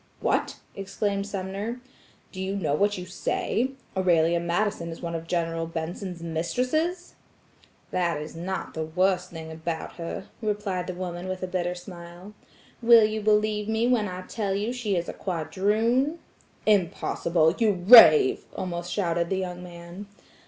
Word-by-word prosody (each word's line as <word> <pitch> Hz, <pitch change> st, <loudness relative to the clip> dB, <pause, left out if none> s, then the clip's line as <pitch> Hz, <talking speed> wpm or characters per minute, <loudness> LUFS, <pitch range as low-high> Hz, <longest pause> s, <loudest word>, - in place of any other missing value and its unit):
"What!" -, -, 0 dB, 0.2 s
exclaimed 200 Hz, 0 st, -2 dB
Sumner, 200 Hz, +4 st, -4 dB, 0.5 s
"do 185 Hz, -, -7 dB
you 190 Hz, +1 st, -2 dB
know 160 Hz, -8 st, -1 dB
what 205 Hz, +6 st, +2 dB
you 180 Hz, -, -6 dB
say? 230 Hz, +7 st, -1 dB, 0.2 s
Aurelia 170 Hz, -2 st, +3 dB
Madison 170 Hz, 0 st, -1 dB
one 170 Hz, 0 st, -6 dB
of 165 Hz, 0 st, -5 dB
General 165 Hz, -1 st, -1 dB
Benson's 170 Hz, +2 st, -5 dB
mistresses?" 255 Hz, -, -1 dB, 0.8 s
"That 175 Hz, -4 st, 0 dB
is 150 Hz, +2 st, -8 dB
not 185 Hz, +3 st, -4 dB
the 160 Hz, -, -3 dB
worst 180 Hz, +3 st, +1 dB
thing 160 Hz, -1 st, -8 dB
about 160 Hz, +1 st, -5 dB
her," 170 Hz, +2 st, -5 dB, 0.2 s
replied 205 Hz, -4 st, -2 dB
the 185 Hz, -, -4 dB
woman 180 Hz, 0 st, -5 dB
with 185 Hz, 0 st, -4 dB
a -, -, -1 dB
bitter 180 Hz, -1 st, -2 dB
smile. 175 Hz, +2 st, -11 dB, 0.5 s
"Will 230 Hz, -2 st, +7 dB
you 215 Hz, 0 st, -2 dB
believe 210 Hz, 0 st, +1 dB
me 220 Hz, +1 st, +1 dB
when 240 Hz, -4 st, +2 dB
I 185 Hz, -1 st, -6 dB
tell 200 Hz, -1 st, -2 dB
you 205 Hz, +3 st, -1 dB
that 250 Hz, -, -3 dB
she 215 Hz, -5 st, -1 dB
is 175 Hz, -1 st, -1 dB
a -, -, -5 dB
quadroon?" 210 Hz, -, 0 dB, 0.5 s
"Impossible! 170 Hz, -4 st, +2 dB
you 225 Hz, -3 st, +4 dB
rave!" 175 Hz, -, +8 dB
almost 175 Hz, -1 st, -4 dB
shouted 170 Hz, -3 st, 0 dB
the 190 Hz, -, 0 dB
young 180 Hz, -1 st, -4 dB
man. 175 Hz, +2 st, -10 dB
185 Hz, 150 wpm, -26 LUFS, 170-210 Hz, 0.8 s, rave